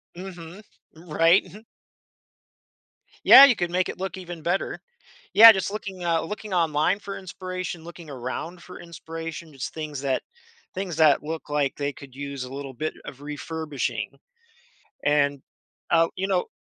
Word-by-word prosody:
Mhm. 180 Hz, 0 st, -9 dB, 0.3 s
Right, 165 Hz, +2 st, +3 dB
mhm. 210 Hz, +5 st, -13 dB, 1.6 s
Yeah, 275 Hz, -, +11 dB
you 250 Hz, -, +4 dB
could 175 Hz, -3 st, -2 dB
make 180 Hz, 0 st, +1 dB
it -, -, -6 dB
look 190 Hz, 0 st, -4 dB
even 175 Hz, -3 st, -8 dB
better. 175 Hz, +4 st, -1 dB, 0.5 s
Yeah, 225 Hz, +1 st, +11 dB
just 195 Hz, -1 st, -2 dB
looking, 190 Hz, -4 st, -6 dB
uh, 165 Hz, -1 st, +2 dB
looking 210 Hz, +3 st, -6 dB
online 165 Hz, +3 st, +2 dB
for 200 Hz, -1 st, -7 dB
inspiration, 185 Hz, -2 st, -6 dB
looking 170 Hz, -2 st, -11 dB
around 140 Hz, +7 st, -6 dB
for 180 Hz, -, -11 dB
inspiration, 165 Hz, -1 st, -8 dB
just 135 Hz, -, -6 dB
things 150 Hz, -3 st, -5 dB
that 135 Hz, -2 st, -1 dB, 0.5 s
things 185 Hz, -4 st, -4 dB
that 155 Hz, -3 st, +5 dB
look 160 Hz, 0 st, -6 dB
like 145 Hz, -2 st, 0 dB
they 145 Hz, 0 st, -2 dB
could 135 Hz, -1 st, -13 dB
use 140 Hz, -2 st, -5 dB
a 125 Hz, -, -8 dB
little 140 Hz, -1 st, -6 dB
bit 155 Hz, +6 st, -3 dB
of 135 Hz, +1 st, -10 dB
refurbishing. 150 Hz, -1 st, -4 dB, 0.9 s
And, 145 Hz, -2 st, +2 dB, 0.5 s
uh, 165 Hz, 0 st, +4 dB
you 190 Hz, -, -1 dB
know 185 Hz, -2 st, +1 dB
165 Hz, 150 wpm, -25 LUFS, 145-185 Hz, 1.6 s, Yeah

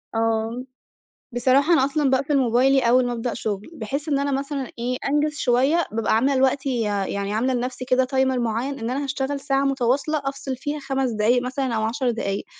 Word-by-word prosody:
آه، 225 Hz, +2 st, 0 dB, 0.7 s
بصراحة 265 Hz, +6 st, +3 dB
أنا 270 Hz, -5 st, +4 dB
أصلًا 285 Hz, 0 st, +1 dB
باقفل 275 Hz, +2 st, +1 dB
موبايلي 260 Hz, +2 st, +3 dB
أول 250 Hz, +1 st, +4 dB
ما 245 Hz, -, -1 dB
ابدأ 235 Hz, 0 st, -3 dB
شُغل، 205 Hz, +1 st, -4 dB
بحيث 280 Hz, +3 st, -4 dB
إن 280 Hz, -2 st, +2 dB
أنا 280 Hz, 0 st, -1 dB
مثلًا 275 Hz, -1 st, -3 dB
إيه 250 Hz, +2 st, -1 dB
أنجز 295 Hz, +1 st, +1 dB
شوية، 270 Hz, +7 st, +2 dB
بابقى 220 Hz, 0 st, +1 dB
عاملة 265 Hz, +5 st, +2 dB
لوقتي 265 Hz, +1 st, +1 dB
يا 205 Hz, -2 st, -1 dB
يعني 200 Hz, +1 st, -3 dB
عاملة 250 Hz, +4 st, +1 dB
لنفسي 250 Hz, +1 st, -3 dB
كده 255 Hz, 0 st, +2 dB
Timer 265 Hz, -1 st, +2 dB
مُعيّن، 240 Hz, +4 st, -2 dB
إن 225 Hz, -, -3 dB
أنا 270 Hz, +3 st, -2 dB
هاشتغل 275 Hz, 0 st, -2 dB
ساعة 275 Hz, 0 st, 0 dB
مُتواصلة 275 Hz, +3 st, 0 dB
أفصِل 275 Hz, -1 st, -3 dB
فيها 290 Hz, +3 st, -4 dB
5 270 Hz, -2 st, -1 dB
دقايق 225 Hz, +3 st, +2 dB
مثلًا 255 Hz, -1 st, -2 dB
أو 220 Hz, -, 0 dB
10 245 Hz, +3 st, 0 dB
دقايق، 200 Hz, -4 st, -3 dB
260 Hz, 190 wpm, -23 LUFS, 235-275 Hz, 0.7 s, أنا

